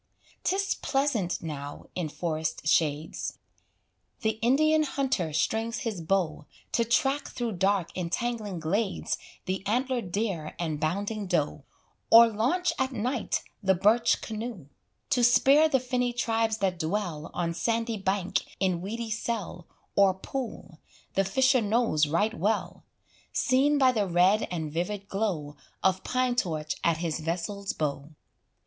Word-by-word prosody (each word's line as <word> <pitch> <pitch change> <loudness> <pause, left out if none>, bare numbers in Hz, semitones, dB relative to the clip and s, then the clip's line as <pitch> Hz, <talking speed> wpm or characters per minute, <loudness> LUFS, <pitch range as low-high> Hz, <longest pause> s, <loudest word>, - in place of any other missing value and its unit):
'Tis 395 +1 +1
pleasant 260 -13 -1
now 145 -2 -6
in 175 -4 -2
forest 160 -1 -3
shades; 155 -1 0 0.8
The 220 -1 0
Indian 310 +6 +4
hunter 265 - 0
strings 225 +9 0
his 220 -9 -3
bow, 160 -4 -1 0.2
To 235 - +2
track 270 +5 +1
through 240 -2 -3
dark 190 -1 +1
entangling 205 +2 -2
glades 195 +5 -1 0.3
The 185 0 -2
antlered 245 -3 0
deer 195 -6 -2
and 160 -3 -2
bounding 200 +6 -2
doe, 150 -5 -1 0.4
Or 230 +1 +10
launch 245 - +1
at 265 0 +1
night 245 +1 -1 0.2
the 190 -2 +3
birch 215 +6 +3
canoe, 220 - -6 0.4
To 250 -4 +3
spear 275 +6 +6
the 265 - +3
finny 250 -1 -1
tribes 225 -2 0
that 190 -4 -1
dwell 165 -2 -2
On 170 -1 -1
sandy 230 +4 -1
bank, 190 -1 0 0.2
in 185 -3 +1
weedy 225 +4 -4
cell, 210 -6 -3 0.3
Or 195 -2 +5
pool, 220 - -6 0.3
the 195 - +2
fisher 260 +6 +3
knows 210 -8 +2
right 205 +9 +1
well 215 +2 -1 0.5
Seen 275 +3 +3
by 260 -2 +5
the 210 -5 0
red 180 +4 +3
and 160 -4 -3
vivid 195 +4 -3
glow 170 -8 -2 0.3
Of 190 0 +2
pine 255 -1 0
torch 155 - -1
at 170 -1 +3
his 165 -2 -2
vessel's 180 +5 -3
bow. 145 -1 -3
205 Hz, 135 wpm, -28 LUFS, 170-240 Hz, 0.8 s, Or